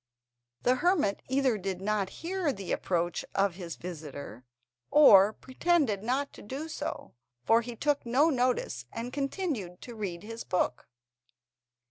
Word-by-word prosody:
The 255 +1 +3
hermit 325 - +2
either 265 -4 +2
did 190 -1 -3
not 200 -1 0
hear 355 -3 0
the 195 -7 -6
approach 175 -1 0
of 195 -2 +2
his 175 -2 -7
visitor, 145 - -8 0.5
or 210 -9 +8
pretended 260 - 0
not 260 +6 -1
to - - -12
do 275 +9 -6
so, - - -5 0.3
for 225 - +4
he 240 0 -7
took 290 +4 0
no 270 +7 +3
notice, 245 - 0
and 240 +2 -5
continued 275 - -3
to 240 - -8
read 195 -5 -5
his 225 +2 -7
book. 180 -8 -1
225 Hz, 140 wpm, -29 LUFS, 185-275 Hz, 0.5 s, or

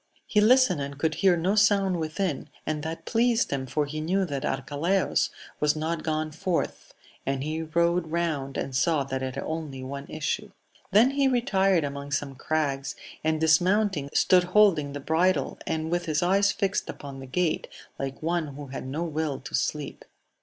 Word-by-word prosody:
He 210 - +2
listened 225 - +5
and 140 0 -5
could 160 +2 0
hear 185 0 +3
no 180 +4 +1
sound 200 -3 +3
within, 160 -1 -2 0.2
and 155 -1 -2
that 160 +2 -5
pleased 235 0 +2
him, 135 -2 -2
for 150 +3 0
he 155 +2 -5
knew 190 +5 +1
that 140 -5 -4
Arcalaus 145 +8 0 0.3
was 150 0 +2
not 160 +1 -2
gone 155 -1 -1
forth; 165 +3 -3 0.3
and 135 0 -1
he 155 +2 -2
rode 170 +1 +1
round, 155 -5 -2
and 135 - -3
saw 150 +2 +2
that 135 -1 -4
it 130 -1 -3
had 135 - -3
only 155 -5 -5
one 140 +1 -6
issue. 205 +7 -2 0.4
Then 225 +7 +6
he 280 0 +2
retired 195 - +2
among 140 0 -5
some 140 -1 -1
crags, 140 -1 -1 0.3
and, 155 0 +1
dismounting, 175 0 +3
stood 180 +2 +4
holding 180 -7 +4
the 145 - -4
bridle, 170 +6 +1
and 160 0 -2
with 175 0 -1
his 155 +1 +1
eyes 200 +3 +3
fixed 195 -2 -1
upon 140 -2 -7
the 135 - -9
gate, 175 +4 0 0.3
like 135 +2 -5
one 165 -4 -1
who 145 0 -7
had 130 0 -6
no 150 +6 -2
will 155 -4 -2
to 135 - -10
sleep. 150 -2 -2
160 Hz, 180 wpm, -27 LUFS, 145-185 Hz, 0.4 s, Then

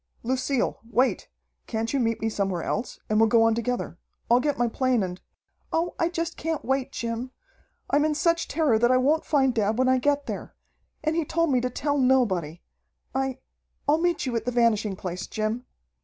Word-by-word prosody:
"Lucille, 260 +1 0
wait! 255 +2 +1 0.4
Can't 225 +1 -2
you 280 - +2
meet 230 -2 0
me 220 - 0
somewhere 195 -5 -1
else, 240 - -3
and 215 0 +2
we'll 225 0 +5
go 230 +1 +5
on 225 0 +4
together. 235 -6 -3 0.3
I'll 240 - +6
get 290 +2 0
my 240 0 +2
plane 250 -1 +1
and 180 0 -5 0.3
" - - -44
"Oh, 335 +2 0
I 330 - +2
just 335 -1 -3
can't 320 -1 -3
wait, 265 0 0
Jim! 235 +2 -3 0.6
I'm 290 +1 +3
in 305 0 +1
such 335 +1 +1
terror 295 -9 +2
that 240 +1 +4
I 255 - +5
won't 295 +5 +2
find 265 -4 +3
dad 220 -1 +1
when 255 0 +3
I 260 0 +4
get 285 +2 +1
there. - - -6 0.5
And 310 0 0
he 335 - +1
told 335 +1 0
me 250 -2 +3
to 250 - -1
tell 285 +3 -1
nobody. 195 - +2 0.5
I 265 -1 -1 0.5
I'll 300 +2 +4
meet 350 -3 +1
you 250 -2 -2
at 225 -1 -1
the 250 - 0
Vanishing 225 -4 +2
Place, 180 -1 -5
Jim." 220 +3 -3
250 Hz, 200 wpm, -26 LUFS, 225-285 Hz, 0.6 s, I'll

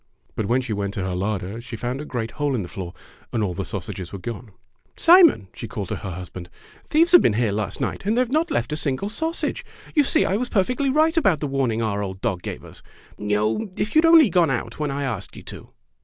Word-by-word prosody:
But 105 - -2
when 125 +4 +2
she 125 -4 -4
went 100 0 -3
to 95 - -2
her 95 -1 -2
larder 100 +3 -3
she 120 0 -8
found 125 +4 -3
a - - -6
great 115 -5 -4
hole 145 -2 -1
in 115 - -1
the 90 - -6
floor, 90 -1 -7 0.4
and 115 -2 0
all 95 -3 -1
the 95 - -3
sausages 95 -3 -5
were 100 - -5
gone. 115 +3 -7 0.5
"Simon!" 335 - +6
she - - -7
called 105 -7 -5
to - - -2
her 95 - -6
husband, 90 0 -8 0.4
"thieves 330 +3 +3
have 355 - +9
been - - +3
here 115 -1 +1
last 105 +1 -3
night, - - -3
and 215 +4 0
they - - +5
have 250 -1 -1
not 315 +4 +1
left 285 - -1
a - - 0
single 155 +5 -1
sausage. 320 +9 -2 0.3
You 295 - +4
see 315 +3 +3
I 195 - +1
was 250 +2 -2
perfectly 250 +7 +1
right 310 +4 +3
about 195 - +3
the - - -2
warning 130 -5 0
our 105 -2 -1
old 95 -2 -5
dog 100 -5 -2
gave - - -7
us. - - -13 0.4
Oh! 105 - 0
if 215 - -2
you 310 - +6
had - - +2
only 320 - +7
gone 170 -2 +4
out 120 -1 -3
when 150 -1 -1
I 140 +1 -2
asked 110 -8 -4
you - - -10
to!" - - -11
125 Hz, 250 wpm, -23 LUFS, -, 0.5 s, have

